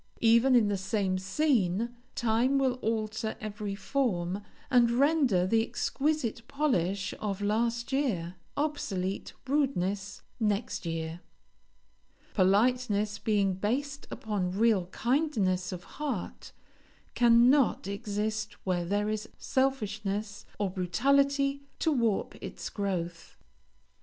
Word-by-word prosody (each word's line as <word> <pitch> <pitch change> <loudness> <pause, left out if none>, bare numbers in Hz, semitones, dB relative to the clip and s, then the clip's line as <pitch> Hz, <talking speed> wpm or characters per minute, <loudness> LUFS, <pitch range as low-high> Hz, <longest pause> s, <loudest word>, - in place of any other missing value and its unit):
Even 235 +3 +5
in 230 -4 +5
the 205 -1 0
same 190 -1 0
scene, 230 - +1 0.2
time 240 +4 +2
will 260 -2 +1
alter 220 0 -2
every 210 -1 -4
form, 200 -6 -1 0.3
and 245 -2 +5
render 260 - +3
the 225 +4 +3
exquisite 260 +1 -1
polish 200 - 0
of 200 -2 -2
last 230 +4 0
year, 215 -12 0 0.2
obsolete 205 -11 -2
rudeness 205 -9 -1 0.2
next 210 -4 -1
year. 165 0 -3 1.1
Politeness, 210 +1 +2
being 200 -3 +2
based 275 +9 -2
upon 195 -4 -2
real 215 -5 +3
kindness 210 - 0
of 180 -1 -6
heart, 280 -10 -5 0.6
cannot 240 +1 +5
exist 210 +1 -2
where 180 -2 0
there 205 +3 0
is 215 +1 -3
selfishness 210 -6 -1
or 200 -3 -1
brutality 275 +10 +2 0.2
to 320 - +1
warp 230 -7 +1
its - - -6
growth. 175 -4 -4
215 Hz, 105 wpm, -29 LUFS, 195-255 Hz, 1.1 s, Even